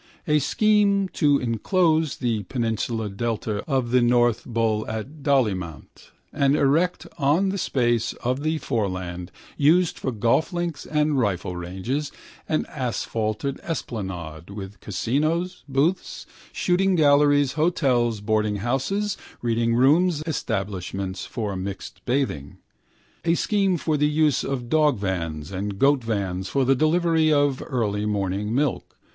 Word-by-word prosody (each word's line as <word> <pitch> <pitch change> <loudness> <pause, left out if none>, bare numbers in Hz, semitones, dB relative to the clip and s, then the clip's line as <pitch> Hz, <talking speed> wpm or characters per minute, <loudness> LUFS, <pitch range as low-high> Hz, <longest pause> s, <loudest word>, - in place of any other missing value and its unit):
A 150 -1 +4
scheme 200 - +2
to 145 -5 +3
enclose 155 - +1
the 115 -4 -1
peninsular 115 -1 -2
delta 105 0 -3
of 130 -3 0
the 125 0 +4
North 120 -1 +2
Bull 115 -2 0
at 120 +8 -6
Dollymount 100 - -1 0.2
and 140 -1 +3
erect 155 +6 +2
on 155 +8 +3
the 195 +1 -2
space 120 -5 +1
of 130 +3 -2
the 155 +1 0
foreland, 95 - -3 0.3
used 165 +4 +3
for 130 - -2
golf 120 - +1
links 175 -3 -3
and 150 -2 +1
rifle 95 -5 -1
ranges, 95 +12 -3 0.4
an 155 - +1
asphalted 120 -1 -2
esplanade 90 - -5
with 100 -1 -8
casinos, 155 - -1
booths, 150 +7 0 0.3
shooting 190 +1 +1
galleries, 145 -3 +4
hotels, 130 -9 +1
boardinghouses, 120 - 0 0.3
readingrooms, 130 +9 +2
establishments 95 - -3
for 105 -5 -3
mixed 95 +1 -6
bathing. 120 - -2 0.7
A 165 0 +2
scheme 195 -1 +1
for 155 -1 0
the 150 +1 +3
use 150 -3 +2
of 130 -3 -3
dogvans 95 - 0
and 100 +1 -4
goatvans 105 -9 +1
for 135 +6 +1
the 135 - +4
delivery 160 +2 +2
of 145 -2 +2
early 105 -6 -1
morning 100 +1 -1
milk. 140 0 -1
125 Hz, 120 wpm, -24 LUFS, 105-150 Hz, 0.7 s, A